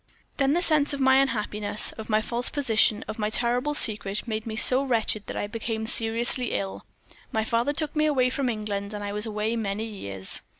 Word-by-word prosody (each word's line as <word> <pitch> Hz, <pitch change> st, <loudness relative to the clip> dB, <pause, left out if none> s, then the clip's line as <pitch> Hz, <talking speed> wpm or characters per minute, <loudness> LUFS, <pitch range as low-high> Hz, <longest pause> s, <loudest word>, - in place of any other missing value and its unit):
"Then 275 Hz, 0 st, +2 dB
the 350 Hz, +2 st, +2 dB
sense 300 Hz, -3 st, +4 dB
of -, -, -8 dB
my 265 Hz, 0 st, +4 dB
unhappiness, 210 Hz, -5 st, -1 dB
of 220 Hz, 0 st, -10 dB
my 215 Hz, 0 st, +2 dB
false 240 Hz, +2 st, +1 dB
position, 225 Hz, -6 st, +1 dB
of 220 Hz, -, -7 dB
my 210 Hz, 0 st, 0 dB
terrible 245 Hz, +6 st, 0 dB
secret, 210 Hz, -3 st, 0 dB
made 220 Hz, 0 st, -4 dB
me 220 Hz, -, -4 dB
so 255 Hz, +4 st, +7 dB
wretched 225 Hz, -5 st, -1 dB
that -, -, -5 dB
I -, -, -2 dB
became 220 Hz, +1 st, -4 dB
seriously 230 Hz, +2 st, +1 dB
ill. 100 Hz, 0 st, -4 dB, 0.4 s
My 220 Hz, -, 0 dB
father 235 Hz, +5 st, 0 dB
took 305 Hz, 0 st, -2 dB
me 305 Hz, 0 st, +2 dB
away 255 Hz, -4 st, +2 dB
from 265 Hz, -1 st, -1 dB
England, 210 Hz, -2 st, -4 dB
and 205 Hz, -, -6 dB
I 205 Hz, 0 st, -4 dB
was 210 Hz, +2 st, -2 dB
away 215 Hz, +1 st, -2 dB
many 215 Hz, -1 st, -3 dB
years. 100 Hz, -, -6 dB
225 Hz, 205 wpm, -25 LUFS, 210-255 Hz, 0.4 s, so